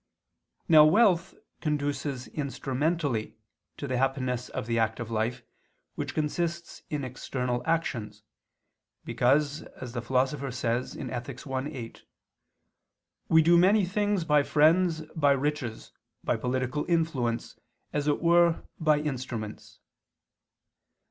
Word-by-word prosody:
Now 155 -3 +8
wealth 180 +1 +4 0.3
conduces 145 -3 -2
instrumentally 140 -3 -2 0.4
to - - -5
the 130 -2 -1
happiness 130 -2 -1
of - - -4
the 115 0 0
active 110 +1 -1
life 115 +2 -1 0.5
which - - -5
consists 170 +3 -2
in 150 -2 -2
external 125 -1 -3
actions, 110 -11 -2 0.8
because 145 +4 +2 0.2
as 125 -2 -6
the 120 - -3
Philosopher 130 +3 0
says 120 0 -2
(Ethic. 125 0 -6
i, 135 -1 -2
8) 120 -7 -8 1.3
"we 160 0 +6
do 170 +2 +6
many 195 +3 +5
things 205 -1 0
by 150 -2 +4
friends, 160 +3 +3
by 145 -3 +4
riches, 140 -4 -3 0.3
by - - +1
political 130 +3 -1
influence, 135 -9 -1 0.3
as 145 0 -1
it 150 +3 +1
were 170 0 +4 0.2
by 155 -2 +3
instruments." 125 -7 -5
140 Hz, 115 wpm, -28 LUFS, 125-160 Hz, 1.3 s, Now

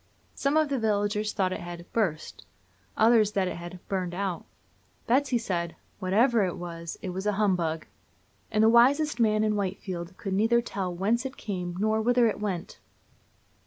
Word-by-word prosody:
Some 280 +2 +1
of 310 -2 +3
the 275 -2 0
villagers 210 -1 0
thought 185 -2 0
it - - -4
had 175 0 -8
"burst," 175 -9 -2 0.5
others 220 -2 +4
that 195 -2 +1
it - - -4
had 175 +1 -8
"burned 185 -3 -2
out." 190 -2 -3 0.6
Betsy 260 +1 +2
said: 175 -7 -3 0.2
"Whatever 215 +4 +3
it 180 -2 -2
was, 170 -1 -6
it 185 - -3
was 190 +3 -4
a 210 - +2
humbug;" 180 -6 0 0.6
and 215 -1 +2
the - - +6
wisest 265 +4 +4
man 215 -2 +3
in 215 -1 +1
Whitefield 185 -2 -4
could 195 - -4
neither 225 +4 +3
tell 195 -6 -3
whence 205 +7 0
it 265 0 -6
came 180 -4 -4
nor 220 +1 +1
whither 245 +1 +3
it 220 - 0
went. 195 -5 -4
205 Hz, 170 wpm, -27 LUFS, 180-230 Hz, 0.6 s, the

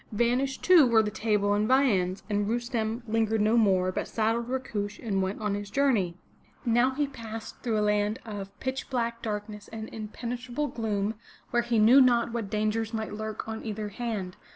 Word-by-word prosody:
Vanished, 250 +4 +1
too, 345 -7 +7
were 225 -2 +5
the 210 - -2
table 210 -1 +1
and 210 +1 +1
viands, 205 -8 +2
and 205 -1 0
Rustem 235 -1 -1
lingered 220 0 +1
no 215 +2 +3
more, 190 -5 +3
but - - -3
saddled 230 +2 0
Rakush 220 -6 -3
and 200 -4 -1
went 190 +2 -2
on 210 -2 -1
his 205 0 -4
journey. 210 -10 +1 0.5
Now 240 +2 +4
he 295 +1 +1
passed 225 -5 -8
through 230 -3 0
a 210 - +2
land 210 +1 +1
of 200 -3 -7
pitch 265 +1 -3
black 235 -2 -1
darkness 210 -1 -5
and 220 -1 -7
inpenetrable 240 +5 -4
gloom, 215 -2 -1 0.4
where 240 -2 +3
he 240 -1 0
knew 230 +6 +7
not 240 -2 +4
what 225 -4 -3
dangers 215 +2 -1
might 220 -1 -3
lurk 215 0 -5
on 220 0 -5
either 215 -1 -4
hand. 205 -4 -4
220 Hz, 180 wpm, -28 LUFS, 210-240 Hz, 0.5 s, too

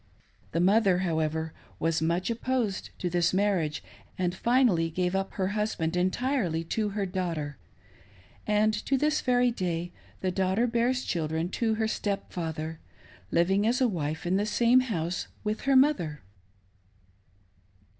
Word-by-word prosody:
The 165 - 0
mother, 195 +1 +4
however, 160 -1 -1 0.2
was 165 0 0
much 170 +6 0
opposed 235 -4 -1
to 180 - -2
this 175 0 +1
marriage, 185 -7 +1 0.3
and 180 -1 0
finally 225 -6 +3
gave 180 +3 -1
up 195 0 -2
her 190 -1 -1
husband 205 -6 -1
entirely 185 - 0
to 215 -2 0
her 200 0 -2
daughter; 170 - -3 0.9
and 210 +1 +3
to 275 - +3
this 305 +3 +1
very 245 -1 +3
day 175 -5 -2 0.3
the 185 - 0
daughter 190 +5 +1
bears 245 +2 +1
children 160 0 -1
to 220 +3 0
her 220 0 0
"step 205 -2 -3
father, 160 -2 -4 0.5
living 190 +5 +2
as 245 +2 +2
wife 160 - -1
in 180 +2 +2
the 205 - +1
same 235 +3 +4
house 180 -9 -2 0.2
with 215 0 -2
her 270 - +5
mother 260 - +3
190 Hz, 140 wpm, -28 LUFS, 165-225 Hz, 0.9 s, her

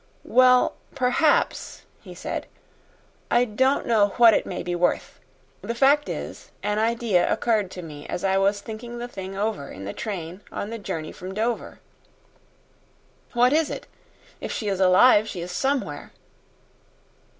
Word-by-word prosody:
"Well, 255 0 +4 0.2
perhaps," 275 +4 +1 0.2
he - - -11
said. - - -5 0.8
"I 240 +1 +4
don't 260 +5 +1
know 205 -4 +3
what 235 -2 +8
it - - +1
may 180 - -4
be 175 0 -3
worth. 175 0 -1 0.4
The 230 +4 -4
fact 280 +4 +4
is, - - -6
an 210 +1 0
idea 225 -4 +1
occurred 215 -5 +1
to 180 -1 -8
me 150 -3 -9
as - - -4
I 195 0 +2
was 200 +1 +1
thinking 230 +3 -8
the 240 0 -5
thing 195 -4 -7
over 205 -9 -2
in 95 +1 -9
the 100 - -5
train 185 -3 -5
on 205 - -5
the 230 - -5
journey 165 -6 -5
from 185 +1 -8
Dover." 230 +3 -2 1.5
"What 245 +2 +4
was 315 0 +2
it? - - -6 0.5
If - - -5
she 210 - -2
is 195 -1 -1
alive, 205 +4 +5
she 180 - -5
is 175 +1 -6
somewhere." 265 +9 -2
215 Hz, 155 wpm, -24 LUFS, 185-240 Hz, 1.5 s, what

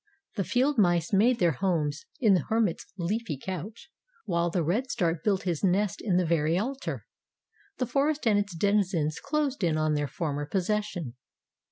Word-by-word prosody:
The 200 - 0
field 260 - +1
mice 175 -2 +2
made 230 +5 +4
their 175 -5 +3
homes 155 -2 -1
in 220 -6 +5
the 180 -6 +2
hermit's 220 -6 0
leafy 180 -2 -2
couch, 190 - -7 0.3
while 170 -4 +1
the 175 0 0
red 220 - 0
start 170 -6 -1
built 195 -3 +1
his 175 -2 -2
nest 195 +1 +1
in 185 -5 +1
the 180 - +2
very 160 0 +2
altar. 265 +7 -3 0.7
The 250 - 0
forest 280 +4 0
and 210 -3 +4
its 200 -3 -3
denizens 180 -5 +1
closed 290 -7 -1
in 160 -3 +2
on 155 0 +1
their 145 -1 0
former 145 -2 -3
possession. 185 - -2
185 Hz, 170 wpm, -28 LUFS, 165-220 Hz, 0.7 s, in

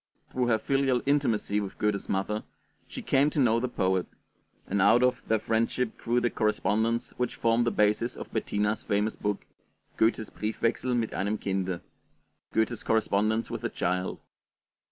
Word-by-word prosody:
Through 125 -1 0
her 115 -2 +3
filial 135 +1 +1
intimacy 135 -7 +1
with 100 -2 -5
Goethe's 105 -2 -1
mother, 105 +2 -1 0.4
she - - -7
came 140 +2 +3
to 150 - -2
know 115 -3 +4
the 125 - -1
poet; 95 -6 0 0.6
and 100 0 0
out 120 +5 +5
of 125 0 +2
their 110 - +3
friendship 115 +2 0
grew 120 +1 +1
the 120 -1 0
correspondence 110 +2 0
which 125 -1 -1
formed 115 +1 +2
the - - +2
basis 105 +3 +1
of - - -9
Bettina's 105 +1 0
famous 105 +2 0
book, 105 -1 -3 0.5
'Goethe's 110 -1 +1
Briefwechsel 115 +3 -1
mit 115 -2 -1
einem 100 +3 -1
Kinde' 95 -3 -2 0.7
(Goethe's 110 +1 0
Correspondence 110 0 +1
with - - -5
a - - 0
Child). 90 +1 -1
110 Hz, 155 wpm, -28 LUFS, 105-120 Hz, 0.7 s, out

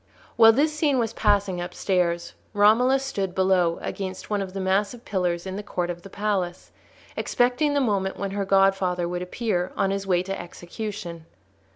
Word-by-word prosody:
While 225 -1 +8
this 300 +5 +2
scene 300 -3 +2
was 230 -2 0
passing 200 -5 +1
upstairs 175 -1 -1 0.2
Romola 225 +6 +5
stood 200 -9 -3
below 185 -3 +2
against 190 +1 -5
one 205 -1 +1
of 190 -1 -5
the 195 - -4
massive 200 +5 0
pillars 180 -3 -1
in 190 0 -5
the - - -3
court 180 -3 -3
of 175 0 -8
the 195 - -11
palace, 195 -4 -2 0.4
expecting 255 +5 +1
the 285 - +3
moment 200 -6 0
when 200 -1 -3
her 200 0 -1
godfather 195 -2 +2
would 175 0 -3
appear, 180 -1 -2
on 195 - +1
his 195 0 -3
way 180 -1 +2
to 195 0 -4
execution. 175 -1 -7
195 Hz, 175 wpm, -25 LUFS, 180-215 Hz, 0.4 s, While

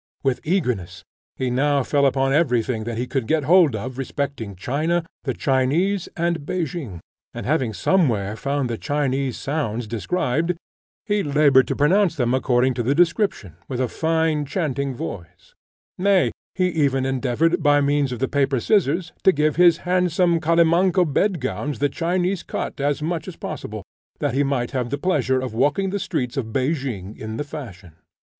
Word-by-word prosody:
With 135 -3 0
eagerness 110 - -1 0.3
he 130 -1 -2
now 140 +2 +2
fell 140 +1 +2
upon 135 0 +1
every 130 -7 +3
thing 110 -3 -3
that 115 -1 -4
he 120 - -1
could 125 -3 -2
get 155 +1 +1
hold 165 -4 +5
of 125 +5 -5
respecting 135 -6 -4
China, 155 - -1 0.2
the 130 - -1
Chinese, 155 +9 +1
and 170 -2 0
Pekin; 155 - -4 0.3
and - - -5
having 130 -5 +1
somewhere 110 - +1
found 140 +2 -1
the 115 -2 -4
Chinese 140 -3 -1
sounds 125 -6 -2
described, 135 - -1 0.5
he 205 -2 +1
laboured 145 -4 +4
to - - -1
pronounce 180 +6 +3
them 125 -2 0
according 130 -1 +2
to 120 - -2
the 130 +5 +1
description, 170 - +1
with 125 -2 -4
a 130 - +1
fine 160 +2 0
chanting 140 -4 -2
voice; 85 -4 -8 0.5
nay, 195 -1 +3 0.2
he 185 -1 +2
even 140 -5 +1
endeavoured, 135 +6 +1
by 145 -1 +4
means 145 -1 +1
of 125 - -3
the 135 +3 0
paper 140 -2 +1
scissors, 170 - +1
to 190 - +7
give 150 -2 +1
his 175 -2 +6
handsome 180 -1 +2
calimanco 170 +3 +3
bed 175 +4 +1
gowns 130 +3 -3
the 145 - +1
Chinese 180 +4 -1
cut - - -5
as 145 +1 0
much 165 +2 -2
as 185 - -7
possible, 110 -11 -6 0.3
that 145 -4 -1
he 135 - +2
might 135 -4 -1
have 125 -2 -2
the 140 - -2
pleasure 140 -6 +1
of 130 -3 -4
walking 145 +11 +1
the 200 - -2
streets 125 -7 -3
of 115 -4 -3
Pekin 130 - -2
in 110 0 -6
the - - -2
fashion. 105 - -9
140 Hz, 170 wpm, -22 LUFS, 125-165 Hz, 0.5 s, to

